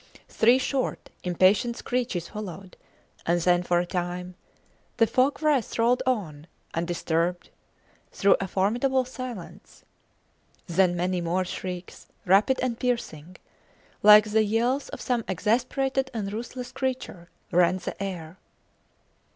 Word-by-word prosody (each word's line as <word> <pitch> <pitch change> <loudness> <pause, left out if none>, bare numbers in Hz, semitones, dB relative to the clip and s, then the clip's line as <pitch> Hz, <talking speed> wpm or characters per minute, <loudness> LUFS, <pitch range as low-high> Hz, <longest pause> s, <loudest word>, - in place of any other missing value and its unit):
Three 240 +3 +4
short, 265 0 -2
impatient 190 +6 +2
screeches 230 -9 -2
followed, 195 -3 -8 0.5
and 175 +1 +3
then, 175 +1 +3
for 175 0 +1
a 175 - +1
time, 180 0 -4 0.6
the 230 - +5
fog 260 +7 +1
wreaths 290 -6 +1
rolled 240 +2 +3
on, 165 - -2 0.3
undisturbed, 170 +1 -1 0.6
through 195 0 +4
a 195 - -2
formidable 245 +8 +1
silence. 255 -7 -9 0.8
Then 175 0 +2
many 180 +1 -1
more 175 +2 0
shrieks, 180 0 -7 0.2
rapid 200 +8 +4
and 240 -2 -2
piercing, 185 -9 -3 0.7
like 210 0 +8
the 220 0 +4
yells 235 +6 0
of - - -8
some 245 -2 0
exasperated 260 +7 0
and 205 -2 -3
ruthless 245 +3 -6
creature, 255 -10 -4 0.2
rent 180 +1 +3
the - - -6
air. 180 -3 -6
200 Hz, 120 wpm, -26 LUFS, 175-245 Hz, 0.8 s, like